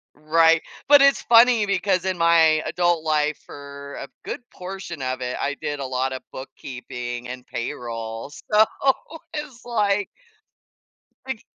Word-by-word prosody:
right, 160 +2 +4 0.3
but 290 -1 +9
it's 275 0 +5
funny 235 -2 +6
because 190 -2 +1
in 185 -1 -1
my 165 -2 +4
adult 175 -2 +1
life 150 -1 +1
for 140 0 -10
a 140 - -6 0.2
good - - -5
portion 180 -4 -7
of 130 0 -3
it, 125 0 -3
I 145 0 -1
did 145 -1 -3
a 135 - -3
lot 130 +1 -1
of 130 - -6
bookkeeping 125 -2 -7
and 125 0 -8
payroll, 115 -1 -5
so 215 +7 +3 0.7
it's 290 -5 -6
like 205 -4 +1 1.2
It 265 -4 -4
155 Hz, 140 wpm, -23 LUFS, 130-195 Hz, 1.2 s, but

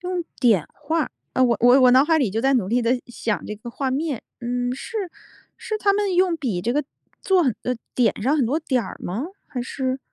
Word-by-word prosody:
用 360 -1 -2 0.2
点 220 - +4
画？ 315 +1 -1 0.2
啊， 260 - +2
我 240 -2 +4
我 245 +3 +6
我 255 -1 +7
脑 260 +2 +6
海 320 +1 +3
里 255 -9 +1
就 220 +4 -1
在 270 +2 +3
努 220 -7 +1
力 240 +4 +2
地 245 +2 +1
想 230 -2 -3
这 210 - -4
个 225 +3 -9
画 265 +2 -2
面。 280 -1 -2 0.2
嗯， 245 +1 -1
是 400 - -5 0.5
是 435 - -4
他 400 -1 +3
们 400 -2 0
用 360 -1 +3
笔 240 - -2
这 230 +6 -1
个 295 +2 0 0.4
做 380 -2 +3
很 260 -6 +2
啊， 250 - 0 0.2
点 230 -4 +1
上 275 +7 +2
很 270 -6 +2
多 280 +7 +1
点 260 -6 0
儿 - - -8
吗？ 220 - -3 0.2
还 250 - -5
是？ 260 +1 -2
260 Hz, 245 characters per minute, -23 LUFS, 240-315 Hz, 0.5 s, 我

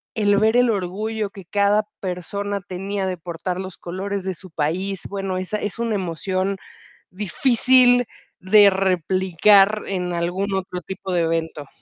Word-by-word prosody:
el 205 -2 +3
ver 220 +2 +3
el 245 -2 +4
orgullo 210 +2 -3
que 195 -3 -12
cada 205 +2 +2 0.2
persona 200 +2 -4
tenía 195 +2 -3
de 185 -1 -2
portar 175 +2 -5
los 190 -1 -7
colores 195 +2 -4
de 190 - -2
su 185 +2 -14
país, 175 +5 -2
bueno, 195 -2 -3
esa 185 +3 -3
es 205 - -4
una 230 -1 -1
emoción 190 +1 -2 0.5
difícil 245 +5 +3 0.3
de 200 +2 +6
replicar 190 +2 +3
en 180 -2 -2
algún 180 +4 -2
otro 185 -1 -4
tipo 190 0 -5
de 175 - +2
evento. 160 -3 -2
190 Hz, 145 wpm, -22 LUFS, 180-205 Hz, 0.5 s, de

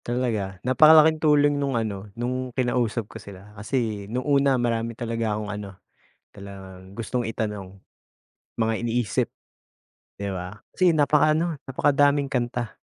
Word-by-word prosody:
Talaga, 115 -6 -2
napakalaking 155 +4 +6
tulong 145 -2 +3
no'ng 135 -3 0
ano, 105 -3 -4
no'ng 125 +2 -2
kinausap 120 -3 0
ko 110 +1 -11
sila, 100 +1 -13
kasi 105 -1 -3
no'ng 125 +3 -3
una, 140 -2 +3
marami 115 -1 -1
talaga 115 -2 -2
akong 105 0 -4
ano, 100 -2 -8 0.6
talagang 95 -1 -11
gustong 120 0 -2
itanong. 105 -4 -5 0.9
Mga 110 0 +1
iniisip, 120 -4 -1 0.9
'di 100 - -2
ba, 95 +2 -6
kasi 180 -2 +2
napaka-ano, 155 +2 +2
napakadaming 140 +1 +2
kanta 120 -3 -2
115 Hz, 125 wpm, -24 LUFS, 105-140 Hz, 0.9 s, napakalaking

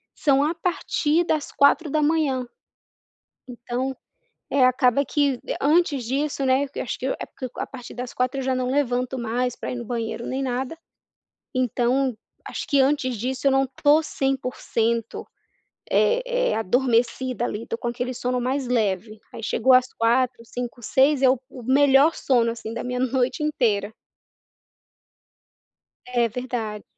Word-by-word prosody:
são 280 -2 +3
a 310 +3 +1
partir 335 -2 0
das 310 -3 -1
04h00. 295 -2 +2 1.0
Então, 250 +2 -4 0.6
eh, 275 -2 +4
acaba 255 +1 +3
que 280 -1 +1 0.2
antes 295 -3 +2
disso, 275 +3 -1
né, 265 +2 +3
eu - - -3
acho 245 - -4
que 255 - -3
é 270 - -2
porque 255 - -7
a - - -2
partir 250 -3 -10
das 250 0 -6
04h00 255 +2 -1
eu - - -4
já 260 0 +1
não 255 0 -1
levanto 255 -2 0
mais 245 +1 -1
pra - - -5
ir - - -4
no 240 - -5
banheiro 230 0 -4
nem 265 +1 -2
nada. 260 +3 -2 0.8
Então, 255 +1 +1 0.3
acho - - -5
que 285 - +3
antes 265 -3 +1
disso 255 +5 -3
eu - - +5
não 270 0 +2 0.2
tô 295 +2 +6
100%, 250 -5 -2 0.6
eh - - +3 0.3
eh, - - 0
adormecida 245 +2 +1
ali 220 -1 -4
estou 230 - -5
com 240 - -4
aquele 245 +2 -3
sono 250 0 -1
mais 260 +1 -1
leve 215 -3 -1
aí - - -7
chegou 230 +4 +3
às 255 0 +4
04h00, 240 +1 +1
05h00, 245 +1 -6
06h00 270 +5 +3
é 260 - +7
o 260 -1 +2
o 250 - -10
melhor 275 +4 +5
sono, 235 -3 +2
assim, 230 -1 -7
da 235 - -4
minha 250 0 -3
noite 255 +2 0
inteira. 220 -9 0 2.2
É 240 -2 +1
verdade. 230 -3 -4
255 Hz, 155 wpm, -24 LUFS, 240-275 Hz, 2.2 s, é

